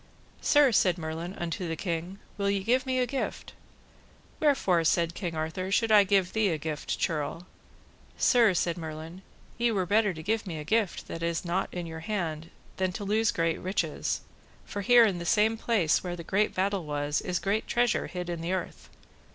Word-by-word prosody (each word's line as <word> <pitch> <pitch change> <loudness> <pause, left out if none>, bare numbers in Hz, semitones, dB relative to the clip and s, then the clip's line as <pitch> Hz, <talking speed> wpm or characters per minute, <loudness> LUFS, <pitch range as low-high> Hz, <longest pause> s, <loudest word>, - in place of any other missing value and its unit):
Sir, 290 -3 +5
said 185 -5 +3
Merlin 165 +3 -5
unto 170 +1 -3
the 165 - -2
king, 175 +2 -4 0.2
will 200 -1 0
ye 200 -1 0
give 255 +5 +1
me 260 0 0
a 250 - +2
gift? 270 +1 -4 0.9
Wherefore, 230 - +3
said 170 +1 +2
King 170 -2 -4
Arthur, 160 +4 -3
should 225 +2 +2
I 205 -2 +7
give 190 -2 +2
thee 220 -2 +2
a 160 - 0
gift, 150 0 -4
churl? 160 +2 -2 0.7
Sir, 230 -6 +4
said 170 0 0
Merlin, 160 +2 -7 0.4
ye 235 0 +3
were 190 -4 0
better 210 +2 +3
to 160 -3 -8
give 215 +2 -1
me 165 -3 -4
a 150 - -5
gift 210 +4 0
that 165 - -6
is 170 +1 -1
not 175 +3 -1
in 175 -1 -4
your 160 -1 -7
hand 165 -5 -3 0.3
than 185 -1 0
to 205 - -5
lose 215 +2 +2
great 165 -1 0
riches, 185 +2 -2 0.4
for 205 - -5
here 240 +3 +7
in 190 -5 0
the - - -5
same 220 +4 +3
place 215 -8 +1
where 175 -1 -3
the 170 - -8
great 205 +5 0
battle 195 0 0
was, 145 0 -1
is 180 -1 -1
great 205 +4 -1
treasure 240 -2 +1
hid 180 -1 -5
in 170 -2 -4
the 170 +3 -2
earth. 185 -2 -5
185 Hz, 195 wpm, -28 LUFS, 165-210 Hz, 0.9 s, I